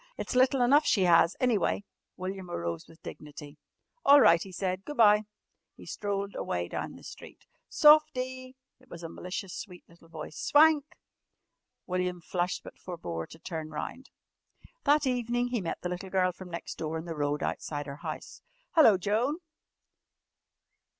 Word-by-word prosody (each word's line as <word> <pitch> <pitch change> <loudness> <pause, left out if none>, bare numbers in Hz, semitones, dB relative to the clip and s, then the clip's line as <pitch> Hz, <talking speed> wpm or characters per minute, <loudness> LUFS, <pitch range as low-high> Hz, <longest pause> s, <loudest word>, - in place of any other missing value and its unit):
It's - - -4
little 255 +1 +3
enough 285 +5 +5
she 190 -3 +3
'as, 170 +1 +5
anyway." 220 -5 +1 0.3
William 185 0 -5
arose 85 - -4
with 165 - -19
dignity. 150 0 -10 0.4
"All 285 +1 +8
right," 170 -10 +6
he 195 - -7
said. 185 +1 -3
"Go' 295 - -7
bye." 210 -3 +5 0.5
He - - -13
strolled 200 -1 -3
away 85 0 -3
down - - -5
the - - -14
street. - - -12 0.2
"Softie!" 260 -4 +4 0.2
It 255 0 -24
was 170 0 -10
a 165 - -5
malicious 180 +1 -6
sweet 180 -4 -9
little 170 0 -20
voice. 160 -1 -8
"Swank!" 300 -1 +5 1.0
William 180 -1 -2
flushed 175 +1 -2
but - - -12
forbore 85 - -6
to - - -13
turn 160 -2 -6
round. 155 - -6 0.8
That 295 0 +4
evening 245 -1 0
he 240 -3 -1
met 165 - -4
the 180 - -3
little 180 +2 -5
girl 185 -1 +2
from 180 0 -11
next 170 0 -7
door 160 0 -3
in 160 - -6
the 170 - -4
road 145 -1 -1
outside 145 -1 -3
her 140 0 -7
house. - - -7 0.3
"Hello, 230 - +6
Joan!" 220 - 0
185 Hz, 160 wpm, -29 LUFS, 165-250 Hz, 1.0 s, All